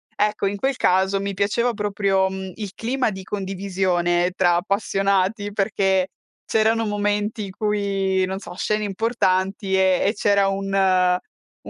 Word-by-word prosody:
Ecco, 210 -1 0
in 200 +1 -2
quel 270 +6 0
caso 190 -1 +2
mi 200 0 -3
piaceva 205 +5 +1
proprio, 200 -2 +1
mhmm, 190 -1 -6
il 205 -3 -6
clima 250 0 -1
di 190 -1 -7
condivisione 185 -3 0
tra 175 -2 +3
appassionati 195 +1 0
perché 195 -2 +1 0.4
c'erano 225 +1 +2
momenti 205 +1 -1
in 190 - -8
cui, 195 -2 0
non 190 +1 -4
so, 180 - -9
scene 215 +2 -1
importanti 195 -2 0
e 190 -1 +3
e 205 - +2
c'era 200 -1 +2
un 195 0 -3 0.9
u - - -6
195 Hz, 145 wpm, -22 LUFS, 190-210 Hz, 0.9 s, tra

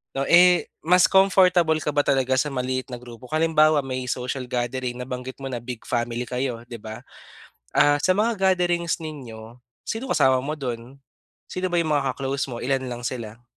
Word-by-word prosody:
'no. 135 - 0
Eh, 180 +1 +5
mas 180 +2 +5
comfortable 180 -4 +4
ka 150 - -1
ba 145 - +3
talaga 130 -1 +2
sa - - +1
maliit 130 0 -2
na 120 - -6
grupo? 120 0 -12
Halimbawa, 155 -1 +4
may 130 -1 -4
social 125 +1 -3
gathering, 125 0 -3
nabanggit 125 +1 -6
mo 135 - -5
na 120 - -3
big 120 -2 -6
family 120 0 -1
kayo, 125 -2 -3
'di 120 -2 -7
ba? 110 +2 -8 0.7
Ah, 145 0 +4
sa 185 - +3
mga 210 -4 +2
gatherings 175 -1 0
ninyo, 120 -7 -9 0.3
sino 225 +4 -4
kasama 135 -6 +4
mo 150 +3 -3
do'n? 125 -1 -6 0.5
Sino 185 0 -2
ba 175 - 0
yung 155 -2 -2
mga 135 -3 +1
ka-close 140 +1 -2
mo? 120 -2 -6
Ilan 135 0 0
lang 120 0 -6
sila? 115 -2 -5
135 Hz, 180 wpm, -24 LUFS, 125-160 Hz, 0.7 s, Eh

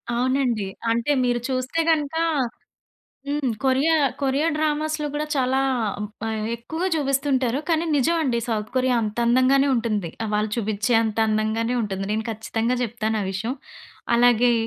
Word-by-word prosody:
అవునండి. 250 -5 +1 0.2
అంటే 235 +5 +1
మీరు 245 -1 +1
చూస్తే 255 +5 -1
గనక 300 -1 0 1.1
హ్మ్. 290 -3 0
కొరియా 270 +5 +3 0.3
కొరియా 275 +4 +1
డ్రామాస్‌లో 305 0 0
కూడా 300 +1 -1
చాలా 260 0 +2 0.6
బా - - -1 0.3
ఎక్కువగా 320 +10 -3
చూపిస్తుంటారు. 275 -3 +1
కానీ 330 +1 +2
నిజం 335 +6 +2
అండి. 240 -4 +1
సౌత్ 215 -1 -2
కొరియా 255 -1 +2
అంత 215 +2 -4
అందంగానే 260 +3 +4
ఉంటుంది. 215 -7 -1
ఆ! - - -3
వాళ్ళు 210 0 0
చూపిచ్చే 215 +2 0
అంత 220 0 -3
అందంగానే 220 +3 0
ఉంటుంది. 195 -1 -3
నేను 220 0 -2
ఖచ్చితంగా 225 +3 -1
జెప్తాను 220 -1 -2
ఆ - - -4
విషయం. 225 +7 -3 0.6
అలాగే 245 0 +5
250 Hz, 140 wpm, -23 LUFS, 220-275 Hz, 1.1 s, అలాగే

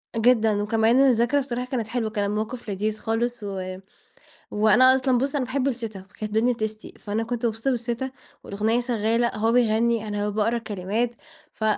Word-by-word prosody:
جدًًا، 225 -3 +3
وكمان 225 +3 +3
الذكرى 255 0 +4
بصراحة 250 -2 -3
كانت 250 -4 -3
حلوة، 225 -1 -2
كان 210 -2 -1
الموقف 220 +3 -4
لذيذ 210 +2 -2
خالص، 235 +1 -2
و 185 -2 -5 0.7
وأنا 230 +5 +5
أصلًا 260 -1 +2
بُص 275 +4 -1
أنا 270 -3 0
باحب 260 +2 -1
الشتا، 230 -6 -3
كانت 195 +3 -12
الدنيا 220 +4 +1
بتشتي، 220 -1 -5
فأنا 210 +2 -2
كنت 240 +1 -3
مبسوطة 225 +3 0
بالشتا 240 +1 -2 0.3
والأغنية 215 +4 0
شغّالة، 235 -1 +1
هو 225 +2 +1
بيغني، 230 -1 +2
أنا 205 0 -2
باقرأ 220 +3 0
الكلمات، 220 +2 -2 0.4
ف - - -8
225 Hz, 165 wpm, -24 LUFS, 215-245 Hz, 0.7 s, وأنا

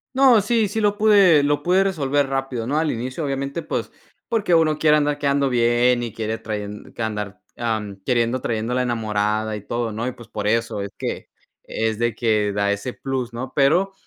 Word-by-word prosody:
No, 260 -5 +6
sí, 225 +1 +1
sí 220 +3 -2
lo 205 -1 +2
pude 200 -8 +5
lo 145 0 +1
pude 185 +2 +3
resolver 145 -7 0
rápido, 135 -3 -3
¿no? 145 +5 0
Al 160 -1 0
inicio, 130 +6 -4
obviamente, 140 +3 -3
pues, - - -4 0.4
porque 220 -7 +1
uno 155 -2 +2
quiere 150 -1 +5
andar 145 0 0
quedando 140 -1 +1
bien 120 0 +3
y 120 -2 -4
quiere 110 0 -3
trayen 105 -2 -6
que 115 - -3
andar 105 -2 -4 0.2
mm, 110 -4 -2
queriendo 120 0 +1
trayendo 115 +1 -2
la 125 - +1
enamorada 110 -2 -1
y 105 - -6
todo, 120 +2 -3
¿no? 115 +3 -3
Y - - -1
pues 120 - -14
por 105 -1 -4
eso 115 -1 0
es 100 - -4
que - - -5 0.3
es 110 0 -2
de 120 -2 0
que 110 -3 +1
da 100 0 +1
ese 100 +5 -3
plus, 130 -3 -4
¿no? 130 +2 -6
Pero, 170 +8 +3
125 Hz, 200 wpm, -22 LUFS, 110-150 Hz, 0.4 s, No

